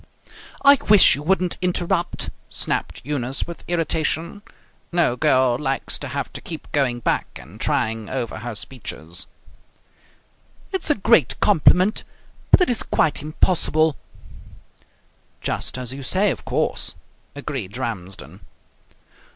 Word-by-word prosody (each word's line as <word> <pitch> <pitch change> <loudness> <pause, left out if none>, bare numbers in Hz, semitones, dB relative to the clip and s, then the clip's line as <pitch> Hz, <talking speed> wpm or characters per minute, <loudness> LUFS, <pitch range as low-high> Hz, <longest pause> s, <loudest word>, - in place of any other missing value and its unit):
"I 280 -1 +8
wish 210 -2 +8
you 145 - -2
wouldn't 180 +2 0
interrupt!" 175 -1 0 0.2
snapped - - 0
Eunice 135 -2 -1
with 170 - -9
irritation. 165 +2 -1 0.5
No 170 -8 +2
girl 125 0 +3
likes 135 -3 -1
to - - -5
have - - -4
to - - -6
keep 160 -2 -8
going 125 -4 +1
back - - -1
and 80 - -13
trying 110 -3 0
over 120 -4 -3
her 120 0 -6
speeches. 95 -7 -4 1.4
"It's 380 -4 -1
a 295 - +4
great 200 - +3
compliment, 190 +2 +4 0.5
but - - +6
it 360 - +4
is 235 - +3
quite 155 -2 +1
impossible." 155 -1 +1 1.4
"Just - - -3
as 125 0 -3
you 140 - -7
say, 190 +9 +1
of - - -7
course," - - -1 0.4
agreed 130 -8 -5
Ramsden. 100 -7 -5
145 Hz, 125 wpm, -22 LUFS, 120-175 Hz, 1.4 s, I